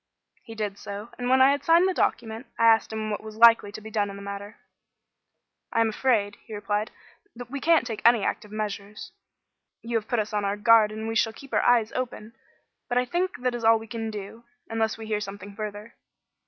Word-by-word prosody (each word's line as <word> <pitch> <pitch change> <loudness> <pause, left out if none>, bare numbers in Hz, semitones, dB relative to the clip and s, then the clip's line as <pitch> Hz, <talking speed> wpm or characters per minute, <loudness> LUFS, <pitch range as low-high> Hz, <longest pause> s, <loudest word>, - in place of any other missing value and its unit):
He 225 - -11
did 210 -2 -4
so, 205 +3 -7
and, 245 0 -2
when 260 0 +6
I 270 - +6
had 285 0 -1
signed 335 +4 +5
the 375 - 0
document, 230 -5 -1
I 230 - +3
asked 225 -1 +4
him 215 0 -3
what 205 - -3
was 215 0 -10
likely 230 -3 +6
to 215 - -9
be 220 +1 -10
done 205 -1 0
in 200 - -8
the 200 - -9
matter. 200 +1 -7 1.1
"I - - 0
am 225 - +3
afraid," 215 -3 0
he 220 - -9
replied, 210 +1 -2 0.5
"that 245 0 -9
we 280 0 -4
can't 330 -6 +4
take 225 -3 -5
any 235 -3 +5
active 210 - -3
measures. 210 -1 -5 0.7
You 230 0 -1
have 220 -1 -5
put 240 - 0
us 215 -1 -2
on 205 -1 0
our 200 +1 -1
guard 220 0 +5
and 220 +1 -5
we 225 - -2
shall 225 0 +1
keep 275 +4 -14
our - - +3
eyes 235 -3 +3
open. 235 -3 -5 0.6
But 245 - 0
I 250 - +2
think 350 0 -2
that 250 -1 +1
is 240 -1 -5
all 225 0 +6
we 225 - -9
can 225 0 -5
do, 210 +2 -8 0.3
unless 225 -1 0
we 225 - -8
hear 215 -1 -1
something 200 0 -8
further." 210 +1 -7
220 Hz, 225 wpm, -26 LUFS, 210-235 Hz, 1.1 s, when